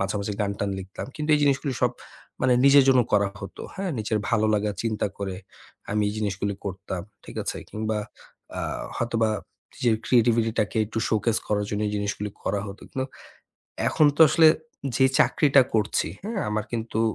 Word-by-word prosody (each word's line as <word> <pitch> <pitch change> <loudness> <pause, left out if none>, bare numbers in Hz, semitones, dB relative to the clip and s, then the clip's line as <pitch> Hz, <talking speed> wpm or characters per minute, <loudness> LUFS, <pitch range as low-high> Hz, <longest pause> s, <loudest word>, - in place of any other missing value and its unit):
মাঝেমাঝে 100 +1 -2
গান 100 - +1
টান 100 -1 -1
লিখতাম। 95 +5 -7
কিন্তু 150 0 -2
এই 150 - +2
জিনিসগুলি 140 -1 +1
সব 125 0 +3 0.5
মানে 130 -1 +4
নিজের 140 -1 +7
জন্য 130 -1 +6
করা 100 -1 +4
হতো, 100 - -8
হ্যাঁ? 190 -2 -2
নিজের 110 0 0
ভালো 110 -2 +3
লাগা 105 0 0
চিন্তা 110 -2 0
করে 95 -2 -3 0.5
আমি 105 0 +1
এই - - -2
জিনিসগুলি 100 -1 -2
করতাম, 95 -2 -5 0.2
ঠিক - - -11
আছে? - - -3
কিংবা 110 0 -2 0.6
আ - - -1 0.4
হয়তোবা 115 -2 +1 0.4
নিজের 120 -3 +2
creativity 115 -2 +3
টাকে 105 +1 -2
একটু 110 +1 -4
showcase 110 0 +1
করার 105 -1 0
জন্য 105 0 -1
এই 105 - -4
জিনিসগুলি 105 0 -2
করা 100 - -1
হতো। 100 - -10
কিন্তু 130 0 -2 0.8
এখন 150 +4 +4
তো - - -5
আসলে 160 +2 +6 0.5
যে 130 - +4 0.2
চাকরিটা 140 -3 +5
করছি, 105 -6 +1 0.2
হ্যাঁ, 215 -2 -2
আমার 105 0 -1
কিন্তু 115 -1 -2
110 Hz, 170 wpm, -25 LUFS, 105-130 Hz, 0.8 s, নিজের